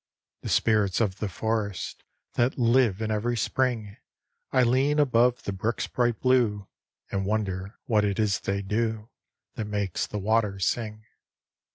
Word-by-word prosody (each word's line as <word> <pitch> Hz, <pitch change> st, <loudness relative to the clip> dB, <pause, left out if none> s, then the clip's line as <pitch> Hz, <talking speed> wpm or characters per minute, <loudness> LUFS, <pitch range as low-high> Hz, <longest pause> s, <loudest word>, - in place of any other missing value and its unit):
The -, -, -5 dB
spirits 105 Hz, -4 st, +2 dB
of 100 Hz, -4 st, 0 dB
the 105 Hz, -, -2 dB
forest, 105 Hz, 0 st, -3 dB, 0.3 s
That 120 Hz, +2 st, +1 dB
live 115 Hz, -4 st, +3 dB
in 110 Hz, -, -1 dB
every 115 Hz, +3 st, 0 dB
spring 115 Hz, -5 st, -1 dB, 0.5 s
I 130 Hz, -, +4 dB
lean 130 Hz, +5 st, +2 dB
above 125 Hz, -4 st, +3 dB
the 100 Hz, -, -3 dB
brook's 110 Hz, +5 st, -1 dB
bright 120 Hz, -3 st, 0 dB
blue 115 Hz, -6 st, +2 dB, 0.4 s
And 95 Hz, -1 st, -1 dB
wonder 100 Hz, -1 st, -2 dB
what 110 Hz, -3 st, +2 dB
it 100 Hz, -2 st, 0 dB
is 105 Hz, -3 st, +1 dB
they 100 Hz, 0 st, -2 dB
do 110 Hz, +2 st, -2 dB, 0.4 s
That 110 Hz, -, -4 dB
makes 100 Hz, -3 st, -2 dB
the 105 Hz, -, -5 dB
water 105 Hz, 0 st, +1 dB
sing. 110 Hz, +2 st, -2 dB
110 Hz, 150 wpm, -27 LUFS, 100-120 Hz, 0.5 s, I